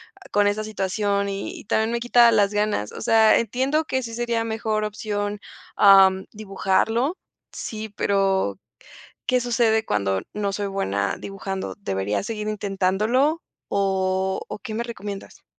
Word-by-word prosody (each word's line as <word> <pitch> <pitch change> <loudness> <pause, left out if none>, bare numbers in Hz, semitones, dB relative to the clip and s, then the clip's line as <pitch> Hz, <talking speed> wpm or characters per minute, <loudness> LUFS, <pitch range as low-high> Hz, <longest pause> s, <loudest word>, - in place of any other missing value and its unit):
ah, - - -18
con 205 0 +3
esa 205 +1 0
situación 200 -1 -1
y 195 0 -5
y - - -12
también 220 +2 +1
me 235 - -1
quita 240 0 +6
las 205 -2 +3
ganas. 205 - 0
O - - -8
sea, 220 -1 +5
entiendo 265 +7 0
que 260 -3 -1
sí 230 -1 -6
sería 235 -1 -1
mejor 220 -1 -1
opción, 205 -1 -3 0.4
ah, 195 -1 +8 0.2
dibujarlo 215 - 0 0.4
sí, 220 0 -6
pero, 195 - 0 0.7
¿Qué 250 0 +2
sucede 230 -2 +2
cuando 95 -2 0
no 205 -1 -1
soy 205 0 -2
buena 100 - -1
dibujando? 195 -1 -5
¿Debería 95 - -2
seguir 210 -1 -4
intentándolo? 215 - +1 0.3
¿O 190 -1 0
o - - -6
qué 215 - -7
me 230 - -1
recomiendas? 205 -4 -8
205 Hz, 145 wpm, -23 LUFS, 195-225 Hz, 0.7 s, ah